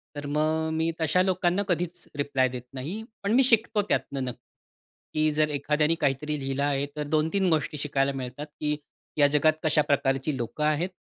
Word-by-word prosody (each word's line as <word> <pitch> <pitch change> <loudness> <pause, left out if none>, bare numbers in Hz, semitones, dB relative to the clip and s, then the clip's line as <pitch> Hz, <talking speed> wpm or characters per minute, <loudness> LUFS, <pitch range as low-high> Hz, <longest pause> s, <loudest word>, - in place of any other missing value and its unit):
तर 145 0 -5
मग 155 +2 +1
मी 160 +1 +1
तशा 160 +3 +3
लोकांना 185 +1 +1
कधीच 175 -1 -2
रिप्लाय 140 -2 +2
देत 125 0 -6
नाही. 160 +12 -5 0.2
पण 200 - 0
मी 260 +3 +6
शिकतो 225 -3 +3
त्यातनं 135 -1 0
नक्की, 125 -2 -5 0.7
की 155 0 +2
जर 150 0 +2
एखाद्याने 150 +2 +1
काहीतरी 145 +2 0
लिहिलं 135 0 -2
आहे 140 -1 +1
तर 150 - -2
2-3 160 +5 +1
गोष्टी 155 -2 0
शिकायला 140 -1 0
मिळतात 130 +2 -5
की 150 0 0 0.4
या 145 -1 +6
जगात 150 +2 +3
कशा 155 -1 +3
प्रकारची 135 +1 +1
लोकं 120 +5 -3
आहेत? 155 +4 +1
150 Hz, 175 wpm, -27 LUFS, 140-160 Hz, 0.7 s, मी